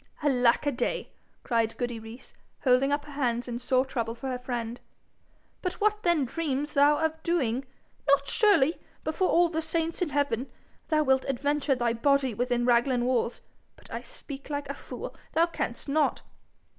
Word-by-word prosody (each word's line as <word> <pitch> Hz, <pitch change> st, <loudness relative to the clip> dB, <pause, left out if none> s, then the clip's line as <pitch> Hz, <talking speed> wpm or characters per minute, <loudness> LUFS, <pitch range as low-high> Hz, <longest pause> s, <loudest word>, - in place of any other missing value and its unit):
'Alack 250 Hz, -3 st, +3 dB
a 290 Hz, -, +2 dB
day!' 245 Hz, -, -2 dB, 0.3 s
cried 230 Hz, -1 st, 0 dB
goody 240 Hz, -2 st, -2 dB
Rees, 225 Hz, +3 st, -11 dB, 0.3 s
holding 265 Hz, +1 st, +4 dB
up 290 Hz, 0 st, 0 dB
her 300 Hz, -, -11 dB
hands 245 Hz, -4 st, -1 dB
in 240 Hz, -1 st, -3 dB
sore 255 Hz, +1 st, +2 dB
trouble 235 Hz, -4 st, -3 dB
for 265 Hz, +3 st, -5 dB
her 250 Hz, -1 st, -2 dB
friend. 240 Hz, -2 st, -4 dB, 0.8 s
'But 365 Hz, -, -1 dB
what 425 Hz, 0 st, +2 dB
then 340 Hz, -7 st, +2 dB
dreams 295 Hz, +1 st, -2 dB
thou 290 Hz, +1 st, +5 dB
of 320 Hz, 0 st, -1 dB
doing? 270 Hz, -7 st, 0 dB, 0.4 s
Not 280 Hz, 0 st, +4 dB
surely, 375 Hz, -8 st, +4 dB, 0.2 s
before 315 Hz, +4 st, 0 dB
all 345 Hz, 0 st, +4 dB
the 320 Hz, -1 st, -1 dB
saints 325 Hz, +2 st, -2 dB
in 355 Hz, -, +1 dB
heaven, 280 Hz, -3 st, 0 dB, 0.4 s
will 305 Hz, -1 st, +3 dB
thou -, -, -11 dB
adventure 280 Hz, +1 st, +1 dB
thy 240 Hz, -2 st, +1 dB
body 270 Hz, +1 st, +2 dB
within 245 Hz, +1 st, 0 dB
Raglan 245 Hz, 0 st, +3 dB
walls? 245 Hz, -2 st, 0 dB, 0.3 s
But -, -, -18 dB
I -, -, -3 dB
speak 280 Hz, 0 st, -10 dB
like 285 Hz, -1 st, -3 dB
a -, -, -4 dB
fool. -, -, -7 dB, 0.2 s
Thou 330 Hz, +1 st, +5 dB
canst 315 Hz, -8 st, -4 dB
not.' 295 Hz, +1 st, +1 dB
275 Hz, 170 wpm, -28 LUFS, 245-305 Hz, 0.8 s, thou